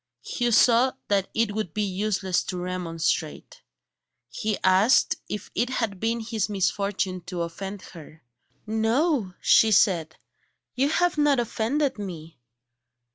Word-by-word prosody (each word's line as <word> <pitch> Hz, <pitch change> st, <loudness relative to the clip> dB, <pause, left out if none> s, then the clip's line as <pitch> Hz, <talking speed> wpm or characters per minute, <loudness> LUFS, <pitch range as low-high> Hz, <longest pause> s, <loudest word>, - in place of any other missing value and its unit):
Hugh 240 Hz, -1 st, -1 dB
saw 240 Hz, +3 st, +4 dB, 0.2 s
that 195 Hz, -2 st, +1 dB
it 225 Hz, -2 st, +1 dB
would 210 Hz, -6 st, -4 dB
be 210 Hz, -, 0 dB
useless 190 Hz, -1 st, -1 dB
to 185 Hz, -, -4 dB
remonstrate. 170 Hz, -3 st, -3 dB, 0.7 s
He 215 Hz, -, -2 dB
asked 190 Hz, +7 st, +4 dB
if 210 Hz, -, -6 dB
it 245 Hz, -, 0 dB
had 225 Hz, -7 st, -2 dB
been 230 Hz, +2 st, -1 dB
his 220 Hz, -2 st, -2 dB
misfortune 200 Hz, -1 st, -1 dB
to 180 Hz, -2 st, -3 dB
offend 190 Hz, +4 st, -7 dB
her. 160 Hz, -2 st, -13 dB, 0.4 s
"No," 225 Hz, -, 0 dB
she 225 Hz, -, +5 dB
said, 165 Hz, -6 st, +3 dB, 0.6 s
"you 270 Hz, +3 st, +1 dB
have 350 Hz, 0 st, +1 dB
not 290 Hz, -3 st, +3 dB
offended 240 Hz, +3 st, -1 dB
me." 165 Hz, -7 st, -8 dB
205 Hz, 130 wpm, -25 LUFS, 185-230 Hz, 0.7 s, she